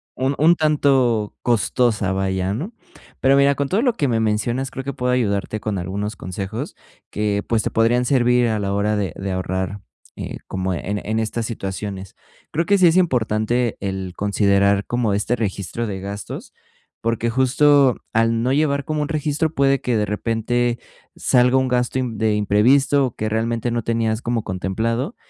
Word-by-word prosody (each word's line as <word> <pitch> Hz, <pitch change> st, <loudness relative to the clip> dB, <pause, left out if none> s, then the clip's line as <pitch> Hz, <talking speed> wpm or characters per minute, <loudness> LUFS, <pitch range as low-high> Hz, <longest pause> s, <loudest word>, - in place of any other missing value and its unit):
un 130 Hz, +2 st, 0 dB
un 165 Hz, +3 st, +5 dB
tanto 135 Hz, -8 st, +2 dB
costosa, 110 Hz, -2 st, +1 dB
vaya, 95 Hz, 0 st, -1 dB
¿no?, 185 Hz, -, -5 dB, 0.5 s
pero, 135 Hz, +1 st, +4 dB
mira, 140 Hz, 0 st, +5 dB
con 140 Hz, 0 st, -2 dB
todo 210 Hz, +6 st, +1 dB
lo 245 Hz, -4 st, +3 dB
que 145 Hz, -, 0 dB
me 115 Hz, -3 st, +1 dB
mencionas, 115 Hz, +4 st, -1 dB
creo 135 Hz, -, -6 dB
que 140 Hz, 0 st, -4 dB
puedo 125 Hz, 0 st, -1 dB
ayudarte 110 Hz, -3 st, -1 dB
con 105 Hz, -1 st, -3 dB
algunos 100 Hz, +4 st, -4 dB
consejos 100 Hz, -, -5 dB, 0.4 s
que, 105 Hz, -1 st, -1 dB
pues, 115 Hz, -2 st, +1 dB
te -, -, -2 dB
podrían 120 Hz, +2 st, +2 dB
servir 125 Hz, -2 st, +3 dB
a 110 Hz, -1 st, 0 dB
la 100 Hz, -1 st, -2 dB
hora 105 Hz, +1 st, +1 dB
de 100 Hz, -5 st, -2 dB
de 95 Hz, 0 st, -4 dB
ahorrar, 95 Hz, +2 st, -3 dB, 0.3 s
eh, -, -, -6 dB
como 95 Hz, 0 st, -2 dB
en 100 Hz, +4 st, -3 dB
en 110 Hz, +1 st, -1 dB
estas 110 Hz, +1 st, -2 dB
situaciones, 95 Hz, -3 st, -5 dB, 0.3 s
creo 165 Hz, +3 st, -1 dB
que 200 Hz, +1 st, +3 dB
sí 180 Hz, -, +6 dB
es 165 Hz, -, +4 dB
importante, 120 Hz, -, +1 dB
el 95 Hz, -2 st, -4 dB
considerar 100 Hz, 0 st, +2 dB
como 120 Hz, -4 st, 0 dB
este 105 Hz, +4 st, 0 dB
registro 105 Hz, +1 st, -3 dB
de 95 Hz, -3 st, -4 dB
gastos, 100 Hz, +1 st, -7 dB, 0.5 s
porque, 115 Hz, 0 st, 0 dB
justo 130 Hz, +2 st, +4 dB, 0.2 s
al 115 Hz, +1 st, +2 dB
no 125 Hz, -, +1 dB
llevar 140 Hz, 0 st, +1 dB
como 155 Hz, 0 st, -2 dB
un 150 Hz, -, -1 dB
registro, 155 Hz, 0 st, -1 dB
puede 140 Hz, -1 st, +2 dB
que, 125 Hz, -, -1 dB
de 105 Hz, -1 st, +1 dB
repente, 115 Hz, +3 st, -1 dB, 0.4 s
salga 125 Hz, +1 st, +3 dB
un, 130 Hz, -1 st, +2 dB
gasto 125 Hz, +1 st, 0 dB
de 110 Hz, -3 st, 0 dB
imprevisto 130 Hz, +6 st, +3 dB
que 110 Hz, 0 st, -2 dB
realmente 115 Hz, +2 st, -1 dB
no 120 Hz, -1 st, -1 dB
tenías 115 Hz, -1 st, 0 dB
como 115 Hz, -3 st, -1 dB
contemplado 115 Hz, -, -2 dB
115 Hz, 175 wpm, -21 LUFS, 105-130 Hz, 0.5 s, sí